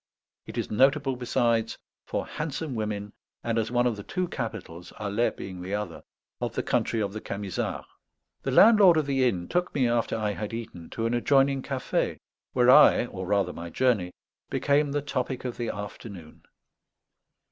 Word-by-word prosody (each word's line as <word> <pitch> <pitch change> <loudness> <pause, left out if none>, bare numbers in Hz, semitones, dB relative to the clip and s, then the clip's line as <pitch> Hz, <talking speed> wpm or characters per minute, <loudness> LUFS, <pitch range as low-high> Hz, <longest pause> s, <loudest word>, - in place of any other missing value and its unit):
It - - -8
is - - -2
notable, 135 +3 +3
besides, 120 -2 0 0.3
for - - -2
handsome 150 -1 -4
women, 105 -2 -3 0.3
and 115 -1 0
as 110 -1 -1
one 120 0 +2
of 120 -3 0
the - - -6
two 185 - -2
capitals, 90 -7 -6
Alais 105 +3 +1
being 90 -2 -8
the 95 +3 -3
other, 105 0 -5 0.4
of - - -3
the - - -1
country 115 - 0
of 100 -2 -1
the 110 - -5
Camisards. 100 -2 -4 0.6
The - - -3
landlord 205 -6 +7
of 155 - +2
the 135 -2 +1
inn 90 -5 -4
took 180 +1 -1
me, 130 -4 +3
after 120 -1 0
I 105 -2 0
had 105 +2 -4
eaten, 110 -8 -8
to 115 - -3
an 115 - 0
adjoining 135 +2 +3
café, 130 -1 -2 0.4
where 125 0 +5
I, 150 -3 +7
or 95 -6 -7
rather 100 0 +1
my 85 +1 -7
journey, 105 -4 +1 0.4
became 145 0 +2
the 145 0 -1
topic 130 -2 -3
of 125 - -4
the 120 -2 -2
afternoon. 100 -5 -8
115 Hz, 175 wpm, -27 LUFS, 105-135 Hz, 0.6 s, landlord